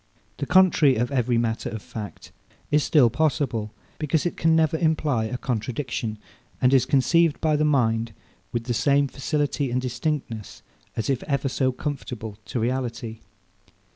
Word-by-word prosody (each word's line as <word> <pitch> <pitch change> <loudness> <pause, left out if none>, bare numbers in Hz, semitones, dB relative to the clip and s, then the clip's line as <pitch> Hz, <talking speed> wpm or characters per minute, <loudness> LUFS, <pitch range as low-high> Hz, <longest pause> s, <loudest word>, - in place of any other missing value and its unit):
The - - -3
contrary 175 -7 +5
of 120 +3 -1
every 125 -3 +1
matter 115 -1 -1
of 110 - -5
fact 105 0 -8 0.4
is 150 0 +4
still 130 -7 +4
possible; 130 -8 0 0.3
because 155 +1 0
it 175 - -1
can 165 0 +3
never 160 -1 +3
imply 155 -7 +1
a 125 +3 -3
contradiction, 120 -2 -3 0.4
and 125 +1 +3
is 130 - +4
conceived 165 +3 +3
by 155 -2 +2
the 150 +1 +2
mind 115 -6 +1 0.4
with 120 -1 -2
the 120 +1 -2
same 140 +3 +3
facility 145 0 -1
and 125 +1 0
distinctness, 125 - -4 0.3
as 110 - -2
if 135 -3 0
ever 140 -2 0
so 130 0 +1
conformable 125 -6 -5
to 120 - -3
reality. 120 -2 -2
130 Hz, 155 wpm, -24 LUFS, 115-150 Hz, 0.4 s, contrary